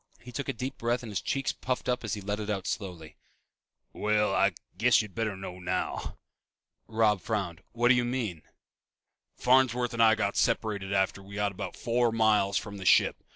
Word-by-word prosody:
He 125 Hz, -, -11 dB
took 140 Hz, +3 st, -4 dB
a -, -, 0 dB
deep 130 Hz, +3 st, -5 dB
breath 120 Hz, +1 st, 0 dB
and 115 Hz, -, -7 dB
his 100 Hz, -, -2 dB
cheeks 135 Hz, 0 st, -1 dB
puffed 130 Hz, -1 st, -3 dB
up 125 Hz, 0 st, 0 dB
as 110 Hz, -3 st, -2 dB
he 105 Hz, -, -7 dB
let 105 Hz, +2 st, -3 dB
it 105 Hz, 0 st, -4 dB
out 100 Hz, -3 st, -2 dB
slowly. 85 Hz, -7 st, -5 dB, 0.8 s
"Well, 105 Hz, 0 st, +1 dB
I -, -, +3 dB, 0.2 s
guess 120 Hz, +6 st, +4 dB
you'd 105 Hz, -3 st, -10 dB
better 110 Hz, -4 st, -2 dB
know 90 Hz, -1 st, -7 dB
now." 90 Hz, -, -3 dB, 0.7 s
Robb 110 Hz, -3 st, +2 dB
frowned. 95 Hz, -5 st, -3 dB
"What 120 Hz, +1 st, +2 dB
do -, -, +8 dB
you 125 Hz, -1 st, +2 dB
mean?" 120 Hz, -9 st, -2 dB, 0.9 s
"Farnsworth 125 Hz, -1 st, +3 dB
and 115 Hz, -, 0 dB
I 110 Hz, -1 st, +6 dB, 0.2 s
separated 100 Hz, -3 st, 0 dB
after 95 Hz, 0 st, +1 dB
we 100 Hz, +1 st, -11 dB
got 105 Hz, -1 st, 0 dB
about 95 Hz, -, -6 dB
four 120 Hz, 0 st, +1 dB
miles 105 Hz, -3 st, +3 dB
from 100 Hz, -1 st, -5 dB
the 95 Hz, -, -7 dB
ship. -, -, +5 dB
110 Hz, 190 wpm, -29 LUFS, 100-120 Hz, 0.9 s, do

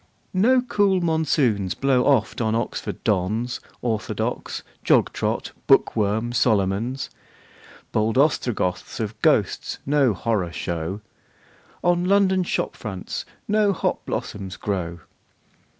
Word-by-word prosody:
No 245 Hz, +7 st, +4 dB
cool 205 Hz, -6 st, +2 dB
monsoons 145 Hz, -, +1 dB
blow 135 Hz, -2 st, +2 dB
oft 125 Hz, -5 st, +2 dB
on 110 Hz, -1 st, +1 dB
Oxford 115 Hz, -, -3 dB
dons. 110 Hz, +5 st, 0 dB, 0.2 s
Orthodox, 110 Hz, -3 st, -2 dB, 0.2 s
jog -, -, +3 dB
trot, -, -, -2 dB, 0.2 s
book -, -, +5 dB
worm 110 Hz, +2 st, 0 dB
Solomons! 115 Hz, +3 st, +1 dB, 0.8 s
Bold 110 Hz, +2 st, +1 dB
Ostrogoths 120 Hz, -, 0 dB
of 110 Hz, 0 st, -4 dB
ghosts -, -, +2 dB
no 140 Hz, -6 st, +3 dB
horror 95 Hz, -3 st, -1 dB
show. 85 Hz, +4 st, -3 dB, 0.8 s
On 175 Hz, 0 st, +3 dB
London 190 Hz, -1 st, +4 dB
shop 175 Hz, -, -1 dB
fronts 95 Hz, -5 st, -5 dB, 0.2 s
no 210 Hz, -1 st, +3 dB
hop -, -, -1 dB
blossoms 95 Hz, -2 st, -4 dB
grow. 85 Hz, -5 st, -3 dB
115 Hz, 110 wpm, -23 LUFS, 100-160 Hz, 0.8 s, book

